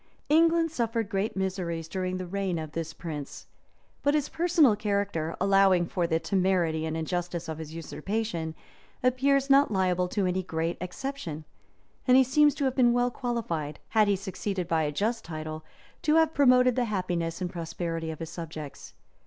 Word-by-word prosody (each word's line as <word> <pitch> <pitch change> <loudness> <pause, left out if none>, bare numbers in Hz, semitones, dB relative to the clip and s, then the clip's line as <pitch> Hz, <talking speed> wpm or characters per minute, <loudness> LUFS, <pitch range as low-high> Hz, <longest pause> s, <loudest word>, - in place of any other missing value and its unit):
England 330 +1 +4
suffered 230 -6 -1
great 200 -1 -1
miseries 180 -4 -2
during 185 +1 -2
the 185 - -4
reign 190 -1 -2
of 155 -2 -5
this 165 0 -4
prince: 155 -4 -7 0.6
but 285 +1 +2
his 300 -1 0
personal 325 - +4
character, 200 -6 -1
allowing 195 -2 +4
for 170 0 -1
the 160 -1 +1
temerity 180 -4 +1
and 160 0 -3
injustice 175 +1 -3
of 160 -1 -5
his 160 0 -7
usurpation, 165 0 -3 0.5
appears 270 +2 +3
not 280 +1 +5
liable 185 -3 +1
to 195 +1 -1
any 185 +1 0
great 165 -1 -2
exception; 180 - -5 0.6
and 255 0 +7
he 265 - +7
seems 295 +3 +4
to 285 - -1
have 260 - +1
been 240 -2 +4
well 245 0 +2
qualified, 175 - -3
had 215 -2 +4
he 200 - +3
succeeded 190 -1 -4
by 165 -2 +1
a 150 -1 0
just 220 +10 -1
title, 155 -1 -6 0.4
to 305 0 +2
have 320 -1 +4
promoted 255 -3 +5
the 250 -1 +1
happiness 180 -5 -2
and 180 -1 -3
prosperity 165 -1 -4
of 160 - -5
his 165 +1 -6
subjects. 155 -4 -8
185 Hz, 170 wpm, -28 LUFS, 165-245 Hz, 0.6 s, and